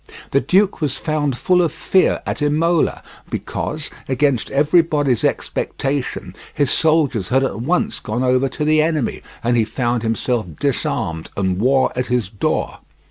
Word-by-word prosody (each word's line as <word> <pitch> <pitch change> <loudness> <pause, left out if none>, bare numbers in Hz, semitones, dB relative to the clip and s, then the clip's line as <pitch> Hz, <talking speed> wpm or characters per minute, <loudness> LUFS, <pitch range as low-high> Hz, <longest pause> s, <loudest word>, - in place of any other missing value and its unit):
The 140 - +3
duke 195 0 +2
was 140 -3 -1
found 145 -4 -1
full 180 +5 +3
of 170 -4 +1
fear 185 +3 +1
at - - -3
Imola, 155 +3 +1 0.3
because, 150 0 -4 0.2
against 135 -2 +1
everybody's 145 -3 +2
expectation, 135 -1 -2 0.2
his 145 -2 +1
soldiers 145 - +2
had 135 +1 +2
at 115 -4 -2
once 180 - 0
gone 120 +4 -3
over 130 +1 +2
to 150 +3 -3
the 155 0 +4
enemy 155 -5 -1 0.2
and 120 +1 +2
he 115 - +3
found 120 +1 -1
himself 115 -1 -1
disarmed 80 0 -1
and 95 -2 0
war 130 +4 +3
at 125 0 -1
his 120 -6 0
door. 100 - -2
135 Hz, 150 wpm, -19 LUFS, 120-155 Hz, 0.3 s, the